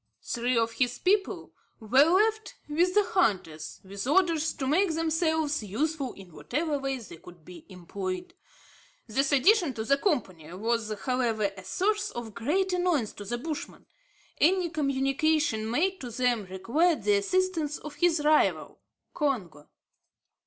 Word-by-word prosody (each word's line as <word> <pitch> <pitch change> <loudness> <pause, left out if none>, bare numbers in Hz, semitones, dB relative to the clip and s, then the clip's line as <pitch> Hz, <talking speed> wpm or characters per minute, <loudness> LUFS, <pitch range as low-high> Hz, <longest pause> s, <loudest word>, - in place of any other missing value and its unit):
Three 245 0 -1
of 230 0 +1
his 245 +1 -1
people 390 +2 0 0.3
were 250 +5 +5
left 435 +6 +1
with 345 +5 +1
the 415 - +5
hunters, 180 - -1
with 195 +4 -6
orders 325 -1 +2
to 265 - -4
make 325 +5 +2
themselves 320 -2 0
useful 270 +6 -2
in 185 -4 -14
whatever 300 - -2
way 270 -1 -2
they 210 -8 -11
could 175 -1 -16
be 175 -3 -13
employed. 185 0 -6 0.7
This 270 +5 0
addition 290 - +4
to 220 - -3
the 275 +5 +2
company 185 - -2
was, 220 +2 -1
however, 230 -5 0
a 190 - -10
source 420 - 0
of 235 -3 -7
great 360 - 0
annoyance 350 - 0
to 205 - -9
the 240 +4 -3
Bushman. 305 +4 -6 0.5
Any 355 +1 +3
communication 275 -4 0
made 365 +9 0
to 250 - -6
them 240 -2 0
required 235 - 0
the 205 0 +3
assistance 325 - 0
of 300 - -9
his 325 -2 +2
rival, 305 0 +2 0.3
Congo. 200 - -2
275 Hz, 145 wpm, -28 LUFS, 220-325 Hz, 0.7 s, were